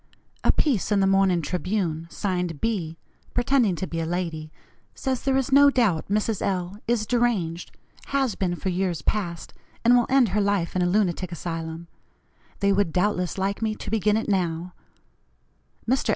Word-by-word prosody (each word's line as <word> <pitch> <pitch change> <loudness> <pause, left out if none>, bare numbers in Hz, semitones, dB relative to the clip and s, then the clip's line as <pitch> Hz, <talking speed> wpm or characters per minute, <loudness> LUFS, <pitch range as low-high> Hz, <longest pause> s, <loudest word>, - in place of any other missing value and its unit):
A - - +5
piece 255 - 0
in 205 - +3
the 195 - +3
morning 195 -3 +3
Tribune, 175 -1 -2
signed 180 -6 -2
'B,' 180 -8 -2 0.4
pretending 245 -6 +2
to 190 - -3
be 165 -2 -4
a - - -2
lady, 165 -3 -3 0.4
says 260 -2 -2
there 270 -1 +1
is 270 0 -1
no 285 +1 +7
doubt 225 - +1
Mrs. 210 +1 0
L. 185 +1 -2
is 230 -2 +1
deranged 205 -8 0 0.4
has 270 -5 +1
been 180 -2 -1
for 190 - -3
years 180 -2 -1
past, 175 -6 -2 0.3
and 240 +1 +7
will 245 -1 +3
end 260 -4 +4
her 210 +3 +1
life 200 -4 0
in 185 - +1
a 175 - +2
lunatic 185 -2 0
asylum. 165 0 -5 0.7
They 200 0 +3
would 195 -4 +1
doubtless 180 0 0
like 195 +2 -1
me 220 -1 0
to - - -7
begin 210 -1 +2
it 220 - -2
now. 180 -3 -1 1.1
Mr. 260 +3 +1
195 Hz, 170 wpm, -25 LUFS, 175-220 Hz, 1.1 s, no